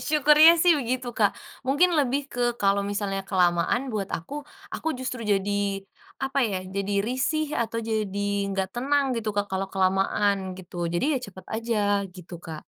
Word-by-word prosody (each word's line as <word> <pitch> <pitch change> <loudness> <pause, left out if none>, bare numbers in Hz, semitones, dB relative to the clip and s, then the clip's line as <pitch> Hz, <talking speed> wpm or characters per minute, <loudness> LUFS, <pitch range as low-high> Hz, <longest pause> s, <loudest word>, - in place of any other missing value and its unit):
Syukurnya 305 +2 +6
sih 345 0 +5
begitu 255 -2 -2
Kak, 205 -3 +4 0.3
mungkin 290 +7 +3
lebih 275 0 +1
ke 245 - -6 0.2
kalo 200 0 +2
misalnya 200 -1 -2
kelamaan 185 +6 +1
buat 200 -2 -3
aku, 285 - -5 0.3
aku - - -7
justru 255 -2 -4
jadi, 205 -2 +1 0.7
apa 270 +1 -2
ya, 205 -5 0
jadi 195 +1 -3
risih 300 +5 -1
atau 230 0 -4
jadi 215 -3 -2 0.3
gak 190 -1 -1
tenang, 280 +4 +1
gitu, 225 -2 -2
Kak, 205 0 -1
kalo 190 0 -2
kelamaan 190 0 +1
gitu, 175 -2 -4
jadi 175 +5 0
ya - - +1
cepet 190 -1 -13
aja 210 -3 +1
gitu, 180 -1 -11
Kak. 160 -2 -8
210 Hz, 160 wpm, -26 LUFS, 195-260 Hz, 0.7 s, Syukurnya